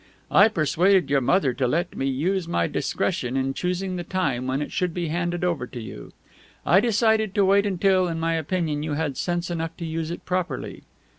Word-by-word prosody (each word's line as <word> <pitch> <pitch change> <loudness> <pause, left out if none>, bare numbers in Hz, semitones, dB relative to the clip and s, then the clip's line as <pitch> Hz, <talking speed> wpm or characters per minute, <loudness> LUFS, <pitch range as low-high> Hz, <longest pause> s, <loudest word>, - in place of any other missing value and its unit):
I 200 - +7
persuaded 180 -3 +2
your 140 -1 +3
mother 135 0 +2
to 125 0 0
let 170 +7 -1
me 135 - -1
use 165 +7 -1
my 85 - +1
discretion 125 +2 -1
in 135 0 0
choosing 180 +3 -2
the 175 - -4
time 140 -9 -1
when 130 +1 0
it 150 - -4
should 180 -2 -1
be 175 -3 -2
handed 175 +1 -2
over 170 -8 -1
to 125 - -8
you. 85 - -9 0.5
I 180 - +5
decided 220 -2 +2
to 200 - +4
wait 200 +1 +4
until, 190 -1 +2
in 165 -1 -3
my 165 0 0
opinion, 160 -2 -1
you 155 0 -3
had 145 -2 -2
sense 175 +3 -2
enough 165 -1 -4
to 170 - -5
use 160 0 -3
it 170 - -7
properly. 180 0 -3
170 Hz, 205 wpm, -24 LUFS, 145-185 Hz, 0.5 s, I